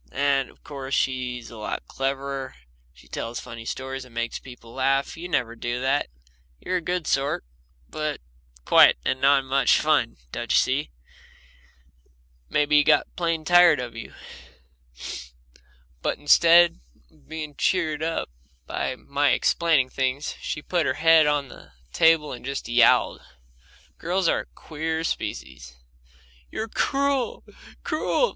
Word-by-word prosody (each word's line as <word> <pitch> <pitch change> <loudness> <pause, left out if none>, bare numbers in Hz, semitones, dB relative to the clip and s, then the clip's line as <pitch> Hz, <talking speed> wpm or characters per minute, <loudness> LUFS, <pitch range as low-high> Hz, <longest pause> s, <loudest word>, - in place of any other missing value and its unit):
And, 140 -2 +1
of - - -22
course, 135 -2 -4
she's 125 -3 -2
a 115 - -10
lot 105 - -4
cleverer. 135 0 -3 0.4
She 60 -1 -20
tells 115 +1 -5
funny 115 -2 -9
stories 130 +2 -5
and 125 -2 -17
makes 120 0 -3
people 125 -3 -13
laugh; 135 +1 0
you 175 +2 -7
never 120 -7 -1
do 120 +1 -3
that 135 +2 +1 0.5
You're 185 - -1
a - - -4
good 175 0 -2
sort, 135 - 0 0.4
but 155 - -3 0.5
quiet - - +7
and 130 - -1
not 140 -1 +4
much 135 -2 +3
fun, - - +1
don't 120 -1 -4
you - - +4
see? 140 +4 +1 1.6
Maybe 150 0 +3
he 145 - +6
got - - +2
plain 165 -2 -1
tired 175 -4 +6
of 120 -2 -6
you." 110 - -9 1.9
But - - -1
instead 170 - +5 0.3
of - - -26
being 155 -2 -6
cheered 155 -1 0
up 165 - -2 0.3
by 130 - -3
my 140 +2 0
explaining 160 -7 +2
things, 135 +2 -2
she 150 - -4
put 175 -3 0
her 130 - 0
head 160 -1 +5
on 145 -2 +1
the - - -15 0.2
table 160 -2 +4
and 120 - -8
just 140 +2 -4
yowled. 120 0 +4 0.8
Girls 180 +2 0
are - - +2
a - - -6
queer 160 +1 -4
species. 65 - -5 0.7
"You're 220 +1 -5
cruel, 275 +1 0 0.4
cruel!" 310 +10 +1
140 Hz, 140 wpm, -24 LUFS, 130-160 Hz, 1.9 s, quiet